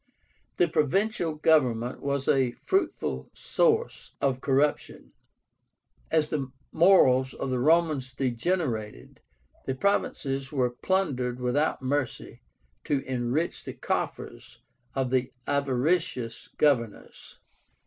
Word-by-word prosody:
The 175 - +4
provincial 165 +2 0
government 130 -7 +2
was 140 -1 -2
a 130 -3 +2
fruitful 385 +1 -2
source 470 -1 0
of 135 -2 0
corruption. 140 +2 0 1.0
As 155 -1 +2
the 135 -4 -3 0.2
morals 130 -7 +4
of 135 - -4
the 125 - 0
Romans 155 -2 +2
degenerated, 125 - -2 0.5
the 130 - -1
provinces 135 -6 -1
were 130 -4 +1
plundered 125 -5 -1
without 130 +3 0
mercy 135 -1 -3 0.4
to 140 -2 0
enrich 130 +6 -2
the - - -6
coffers - - -4 0.3
of 130 -2 -1
the 130 -1 +1
avaricious 140 -3 -1
governors. 120 -8 -1
135 Hz, 100 wpm, -27 LUFS, 125-155 Hz, 1.0 s, The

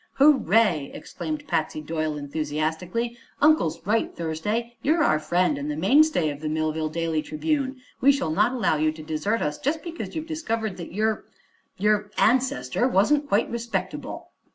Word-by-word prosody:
"Hooray!" 225 - +4
exclaimed 305 -2 -6
Patsy 155 -1 -1
Doyle 155 0 -2
enthusiastically. 160 +10 -2 0.2
"Uncle's 300 - +3
right, 220 +3 +1
Thursday. 210 +9 -2
You're 315 +2 +2
our 155 - +3
friend, 155 -1 +1
and 145 +1 -4
the 150 - -2
mainstay 195 - +4
of 145 - -8
the 155 - -2
Millville 155 0 -1
Daily 165 -1 -1
Tribune. 285 - -2 0.2
We 275 - +7
shall 220 - -1
not 210 +8 +3
allow 235 -10 +1
you 155 +1 +2
to 155 0 -10
desert 160 +9 -1
us 150 0 -2
just 310 +4 -1
because 335 -1 -6
you've 315 -1 -3
discovered 230 - -3
that 170 - -7
your 215 +3 0 0.5
your 210 +1 +2
ancestor 240 - +2
wasn't 285 +7 +2
quite 210 0 +2
respectable." 235 0 -4
205 Hz, 155 wpm, -25 LUFS, 155-260 Hz, 0.5 s, We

